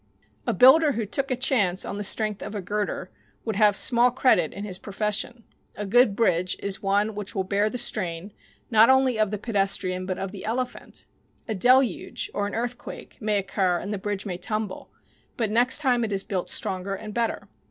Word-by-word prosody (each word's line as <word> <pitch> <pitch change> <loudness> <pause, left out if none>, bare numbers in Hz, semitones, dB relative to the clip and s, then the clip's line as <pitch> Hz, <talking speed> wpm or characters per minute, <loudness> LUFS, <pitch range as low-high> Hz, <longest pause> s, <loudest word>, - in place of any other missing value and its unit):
A - - +2
builder 280 - +6
who 225 -2 -2
"took 270 +6 -2
a 255 - +1
chance" 215 -8 +1
on 200 - -5
the 205 - -3
strength 210 0 -1
of 210 +1 -6
a - - -2
girder 205 +2 -3 0.3
would 220 -3 -2
have 210 -2 +4
small 240 +4 +4
credit 245 - +2
in 200 - -7
his 185 -3 -4
profession. 210 +3 -3 0.3
A 205 - -4
good 220 0 +4
bridge 180 -5 +1
is 200 -1 -2
one 205 +2 +1
which 205 -1 -5
will 190 - 0
bear 200 +3 +1
the 250 - -5
strain 190 -5 -1 0.4
not 225 +1 +6
only 265 -3 +3
of 215 -2 +2
the 210 - -3
pedestrian, 195 -4 -1
but 185 -1 -2
of 195 -1 -4
the 200 - -9
elephant. 245 +3 -4 0.4
A 220 - -2
deluge 245 +1 +2
or 205 0 -1
an - - -6
earthquake 240 +2 -6
may 210 -1 +1
occur 190 -2 0
and 205 +4 -5
the 205 - -3
bridge 205 0 -4
may 180 -3 -4
tumble, 215 +1 -3 0.5
but 220 -3 -1
next 245 +4 +4
time 255 -5 +1
it 220 - -2
is 195 -1 -1
built 185 -3 -3
stronger 190 +1 -1
and 210 +2 -8
better. 230 0 -2
210 Hz, 200 wpm, -25 LUFS, 195-235 Hz, 0.5 s, builder